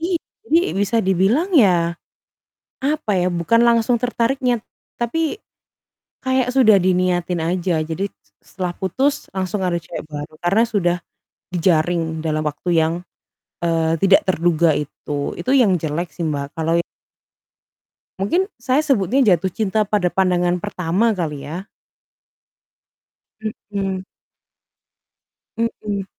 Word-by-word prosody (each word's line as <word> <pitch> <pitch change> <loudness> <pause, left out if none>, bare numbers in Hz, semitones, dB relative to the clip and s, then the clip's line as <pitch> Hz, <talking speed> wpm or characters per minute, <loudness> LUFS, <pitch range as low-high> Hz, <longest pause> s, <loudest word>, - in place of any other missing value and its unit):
I 345 +1 0 0.3
jadi 340 +4 +3
bisa 205 +3 +1
dibilang 195 - +2
ya, 175 - +4 0.9
apa 280 -6 -1
ya, 180 0 +2
bukan 175 +7 +2
langsung 235 0 +3
tertariknya, 245 0 0 0.4
tapi 320 - -1 0.9
kayak 260 -1 +1
sudah 220 -7 +6
diniatin 180 -1 +1
aja. 175 0 0
Jadi 165 +6 -3
s 100 0 -39 0.2
setelah 180 -2 -3
putus 260 +12 -1
langsung 190 +1 -2
ada 175 -2 0
cewek 165 0 -7
baru, 150 +1 -7
karena 195 +6 +3
sudah 180 -6 +1 0.6
dijaring 165 -1 +1
dalam 155 -1 0
waktu 150 +4 -4
yang, 160 0 +3 0.7
eee, 165 -1 +1
tidak 195 +2 +5
terduga 170 -2 +3
itu. 145 0 -4
Itu 255 - -1
yang 220 -9 +5
jelek 160 +3 -2
sih, 170 - -4
Mbak, 145 -1 -4
kalau 165 +1 +1
i - - 0 1.4
Mungkin 340 - +2 0.2
saya 260 +5 +1
sebutnya 260 - +2
jatuh 180 +2 +2
cinta 215 0 0
pada 200 -5 +1
pandangan 180 -2 +1
pertama 205 +3 0
kali 150 -5 -4
ya. 175 +5 -5 2.1
Mhm. 195 -2 -2 1.5
Mhm. 210 -3 -2
185 Hz, 120 wpm, -20 LUFS, 170-230 Hz, 2.1 s, sudah